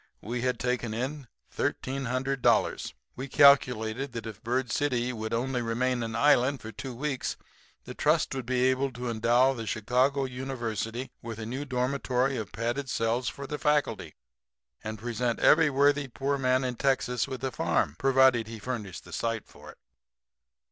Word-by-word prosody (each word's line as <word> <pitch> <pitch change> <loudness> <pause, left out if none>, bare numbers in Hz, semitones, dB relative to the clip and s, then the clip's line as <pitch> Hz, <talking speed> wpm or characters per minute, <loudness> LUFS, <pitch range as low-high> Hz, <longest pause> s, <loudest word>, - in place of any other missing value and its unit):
We 120 +2 -3
had 125 0 0
taken 125 -3 -1
in 135 +3 -4 0.3
$1,300. 135 0 0 0.2
We 130 +2 -5
calculated 130 -2 +4
that 115 - -5
if 110 -3 -8
Bird 125 +1 -1
City 125 -4 0
would 110 -1 -5
only 125 +2 -1
remain 120 +2 0
an 115 -1 -3
island 140 +1 +4
for 110 - -8
two 125 +4 -7
weeks 135 0 -2 0.5
the - - -8
trust - - +2
would 130 -3 -5
be 125 -1 +1
able 130 +1 +1
to 120 0 -4
endow 120 +4 +3
the 115 -3 -6
Chicago 125 +6 +1
University 125 -2 -4
with 115 -2 -6
a 115 - -5
new 130 +6 -4
dormitory 130 0 0
of 110 -3 -5
padded 120 +4 -2
cells 115 +2 0
for 140 - -8
the 150 +2 -5
faculty, 145 - 0 0.7
and 110 0 -5
present 120 +1 -2
every 160 -1 +5
worthy 140 +1 +3
poor 135 +3 -1
man 130 -1 +2
in 125 -2 -3
Texas 130 -3 +1
with 130 -1 -6
a 130 - -1
farm, 75 - 0
provided 130 -4 +4
he 115 0 -7
furnished 105 -5 -5
the 90 - -12
site 115 +4 -2
for - - -15
it. - - -13
125 Hz, 165 wpm, -28 LUFS, 115-135 Hz, 0.7 s, every